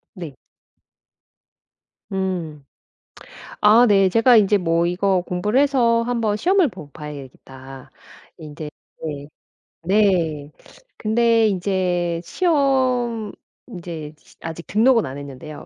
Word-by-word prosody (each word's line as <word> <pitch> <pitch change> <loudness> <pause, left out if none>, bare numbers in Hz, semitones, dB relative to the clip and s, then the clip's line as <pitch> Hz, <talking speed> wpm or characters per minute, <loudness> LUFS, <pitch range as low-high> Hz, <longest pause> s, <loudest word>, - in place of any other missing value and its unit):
네. 165 -7 -8 1.8
음. 180 -6 -4 1.0
아 220 +4 +6
네 195 -3 +4
제가 230 +5 +4
인제 205 -1 +4
뭐 170 -1 0
이거 185 +1 0
공부를 185 +7 -1
해서 240 -5 +2
1 240 0 -2
번 210 -2 0
시험을 360 - +2
보 150 -9 -11
봐야 150 -1 -8
되겠다. 135 -1 -12 0.5
인제 150 -1 -8 0.3
네. 145 -2 -5 0.6
네. 170 -7 +1 0.5
근데 230 0 +2
인제 180 -3 -1
시험 255 - 0 0.4
인제 170 -7 -8
시 - - -23
아직 165 +1 -7
등록은 230 +2 +3
안 135 0 -7
했는데요. 140 +2 -10
190 Hz, 190 characters per minute, -21 LUFS, 155-230 Hz, 1.8 s, 아